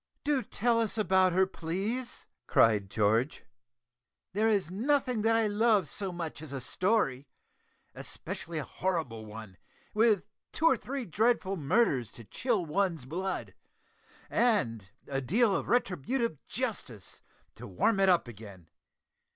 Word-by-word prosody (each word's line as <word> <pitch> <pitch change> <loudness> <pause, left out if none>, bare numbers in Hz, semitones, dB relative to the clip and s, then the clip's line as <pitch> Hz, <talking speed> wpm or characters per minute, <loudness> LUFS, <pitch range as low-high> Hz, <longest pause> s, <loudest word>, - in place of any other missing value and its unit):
"Do 285 -2 +1
tell 235 -1 +1
us 225 -1 0
about 190 -2 +3
her, 190 +1 +4
please," 195 +9 -4 0.2
cried 105 -4 +4
George. 110 +7 +1 0.9
"There 215 +3 +2
is 200 -6 +1
nothing 250 +2 +1
that 225 +1 +3
I 225 -1 +3
love 210 -3 +3
so 195 +4 -4
much 165 -3 -5
as 155 -3 -9
a 140 - -4
story 145 - 0 0.7
especially 165 0 -6
a 150 - -2
horrible 155 -15 -3
one, 105 -3 -10 0.4
with 215 -3 +3 0.3
two 320 - -1
or 295 - +6
three 265 +1 -5
dreadful 205 +1 +1
murders 140 - +1
to 120 - -10
chill 220 - -1
one's 165 -3 0
blood, 185 +7 -4 0.7
and 115 - +1 0.2
a 135 -1 -2
deal 205 - +2
of - - -3
retributive 230 - 0
justice 205 - -5 0.3
to - - -10
warm 195 - +1
it 195 -1 +5
up 175 -7 +3
again. 100 -7 -11
190 Hz, 135 wpm, -30 LUFS, 135-225 Hz, 0.9 s, or